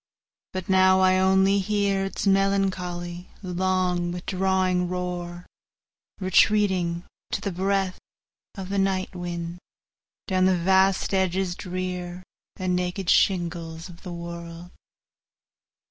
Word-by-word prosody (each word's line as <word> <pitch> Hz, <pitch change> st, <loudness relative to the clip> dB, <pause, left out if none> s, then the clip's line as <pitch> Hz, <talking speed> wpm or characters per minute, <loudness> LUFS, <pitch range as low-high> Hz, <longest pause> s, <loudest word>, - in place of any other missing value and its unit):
But 185 Hz, -1 st, -5 dB
now 190 Hz, 0 st, +5 dB
I 185 Hz, 0 st, +4 dB
only 190 Hz, +1 st, +4 dB
hearIts 200 Hz, -1 st, 0 dB
melancholy, 185 Hz, -3 st, 0 dB, 0.2 s
long, 180 Hz, -1 st, 0 dB
withdrawing 185 Hz, 0 st, 0 dB
roar, 175 Hz, -1 st, -4 dB, 0.7 s
Retreating, 185 Hz, -3 st, +2 dB, 0.3 s
to -, -, 0 dB
the 200 Hz, -, -3 dB
breathOf 190 Hz, +1 st, 0 dB, 0.7 s
the 200 Hz, +1 st, -1 dB
night 190 Hz, -1 st, 0 dB
winds, 175 Hz, -1 st, -5 dB, 0.7 s
down 185 Hz, -2 st, +2 dB
the 185 Hz, -1 st, +3 dB
vast 190 Hz, +2 st, +3 dB
edges 190 Hz, -1 st, +1 dB
drearAnd 180 Hz, -1 st, -5 dB, 0.5 s
naked 180 Hz, +1 st, 0 dB
shingles 170 Hz, -2 st, +1 dB
of 170 Hz, -1 st, -13 dB
the 180 Hz, -, -7 dB
world. 170 Hz, 0 st, -8 dB
185 Hz, 100 wpm, -25 LUFS, 175-190 Hz, 0.7 s, now